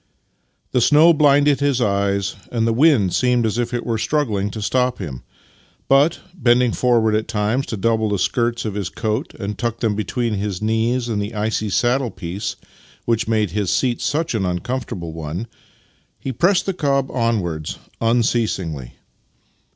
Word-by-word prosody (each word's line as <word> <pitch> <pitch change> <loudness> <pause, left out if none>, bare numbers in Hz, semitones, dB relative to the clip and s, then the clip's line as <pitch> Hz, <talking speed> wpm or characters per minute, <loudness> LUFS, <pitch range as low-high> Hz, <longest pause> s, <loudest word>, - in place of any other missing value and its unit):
The 125 - +2
snow 155 +7 +6
blinded 145 -2 +4
his 140 -3 +1
eyes 100 -3 0 0.2
and 115 -2 0
the 115 - +2
wind 125 - +4
seemed 125 -2 +2
as 110 +2 -1
if 120 - -1
it 120 - -3
were 115 -2 -1
struggling 110 -5 0
to 110 - -7
stop 125 +4 0
him, 70 -10 -6 0.7
but, 140 +4 +3
bending 125 -6 +3
forward 115 -3 +2
at 110 +1 0
times 115 +4 -1
to 110 - -4
double 110 +1 +1
the 100 - 0
skirts 120 +4 0
of 105 - -2
his 100 -3 -3
coat 110 +8 -3
and 100 0 -5
tuck 115 -1 -2
them 110 -3 +1
between 110 +3 -2
his 100 -2 -2
knees 115 +3 0
and 110 -3 -1
the 105 +2 -5
icy 110 0 -1
saddle 125 +5 +1
piece 90 0 -5 0.5
which 115 -1 0
made 110 -4 +1
his 100 -1 -1
seat 120 +3 0
such 150 +5 -1
an 110 -4 0
uncomfortable 90 -1 -3
one, 80 +6 -5 0.7
he 135 - -4
pressed 175 - +2
the 195 - -1
cob 140 -5 0
onwards 100 - -1 0.2
un 115 +1 +3
ceasingly. 85 - -2
115 Hz, 165 wpm, -20 LUFS, 105-125 Hz, 0.7 s, snow